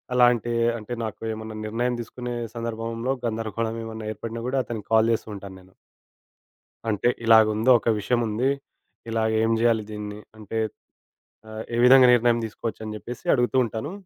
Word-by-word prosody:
అలాంటి 120 -1 +4 0.3
అంటే 110 +2 -7
నాకు 110 -1 -7
ఏమన్నా 110 0 -7
నిర్ణయం 120 +3 -1
తీసుకునే 120 +1 -6 0.2
సందర్భంలో 115 +2 -3
గందరగోళం 115 0 -2
ఏమన్నా 110 -1 -6
ఏర్పడినా 115 +1 -6
గూడా 135 +1 -1
అతనికి 110 -4 -6
కాల్ 110 +1 +5
జేస్తూ 110 - -3
ఉంటాను 95 -1 -9
నేను. 95 0 -20 1.2
అంటే 110 +3 +2 0.2
ఇలాగుందో 110 +2 +5
ఒక - - -1
విషయం 120 +4 +1
ఉంది, 120 +6 0 0.6
ఇలా 115 -1 0 0.2
ఏం 115 0 +2
జేయాలి 115 -2 +3
దీన్ని, 105 0 -6 0.2
అంటే 110 +1 -6 0.9
ఆహ్ 110 +1 -6
ఏ - - -1
విధంగా 130 0 +8
నిర్ణయం 120 0 +3
తీసుకోవచ్చు 110 +1 -5
అని 110 0 -5
జేప్పేసి 120 +2 -8
అడుగుతూ 125 0 +1
ఉంటాను. 115 - -5
115 Hz, 150 wpm, -25 LUFS, 110-120 Hz, 1.2 s, విధంగా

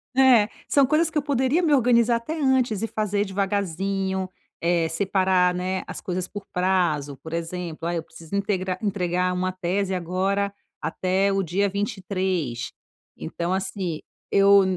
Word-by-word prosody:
né, 255 -5 +6 0.2
são 280 -2 +4
coisas 310 +4 +2
que 310 - -3
eu - - +3
poderia 275 +3 +1
me 310 - +3
organizar 235 -3 +4
até 305 +8 -5
antes 255 -6 +2
e 225 - 0
fazer 210 -2 0
devagarzinho, 195 -1 -1 0.3
eh, 170 -1 +2
separar, 185 0 +2
né, 185 +1 -2
as - - -6
coisas 180 0 -2
por 205 -1 -7
prazo, 175 -6 +1
por 160 - -8
exemplo, 170 -1 -4
ah, 175 - -1
eu 165 - -2
preciso 165 +4 -9
integrar 190 -2 -1
entregar 180 -3 0
uma 185 0 -1
tese 185 +1 -1
agora 195 +3 -1 0.3
até 190 +2 +1
o 195 - +1
dia 195 +3 0
23, 185 - -2 0.5
então, 170 - -3
assim, 185 -4 -3 0.3
eu 200 0 +6
190 Hz, 150 wpm, -24 LUFS, 180-205 Hz, 0.5 s, né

